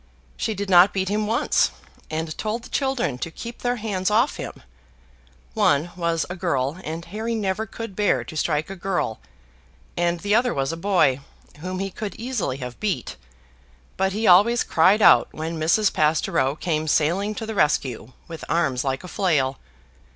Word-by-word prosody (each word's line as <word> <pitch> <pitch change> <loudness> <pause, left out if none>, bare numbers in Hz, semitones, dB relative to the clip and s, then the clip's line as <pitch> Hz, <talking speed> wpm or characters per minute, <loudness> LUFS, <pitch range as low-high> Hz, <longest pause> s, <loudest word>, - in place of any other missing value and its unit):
She 220 - -2
did 200 +1 -4
not 185 +1 +6
beat 190 -1 0
him 210 +1 0
once, 235 +7 +2 0.4
and 160 0 -3
told 220 +2 -3
the - - -11
children 265 - -1
to 165 - -3
keep 235 +8 -8
their 245 0 0
hands 205 -4 -2
off 230 +7 +2
him. - - -7 0.9
One 145 - +2
was 170 -2 0
a 180 - -6
girl, 160 -4 -1
and 165 +2 -5
Harry 220 +6 -3
never 210 0 -2
could 225 -1 -7
bear 205 0 +1
to - - -10
strike 155 +2 -1
a - - -5
girl; 175 - -2 0.8
and 170 0 0
the 205 0 0
other 245 +3 +2
was 135 +1 -1
a - - -4
boy, 170 -7 +2 0.4
whom 185 +3 -5
he 195 +1 -3
could 210 +2 -6
easily 230 - -3
have 125 -2 -7
beat, 210 -4 -2 0.8
but 190 0 +1
he 215 +3 -2
always 210 +7 +6
cried 195 +6 +4
out, - - +7
when 160 +1 -4
Mrs. 185 +7 +2
Pastoureau 150 -3 +1
came 155 -1 -2
sailing 180 +8 +1
to 220 - -5
the 220 - -4
rescue 130 - 0
with 165 -2 -8
arms 140 -7 +1
like 135 +2 -2
a - - -8
flail. 150 -9 0
180 Hz, 175 wpm, -23 LUFS, 155-210 Hz, 0.9 s, out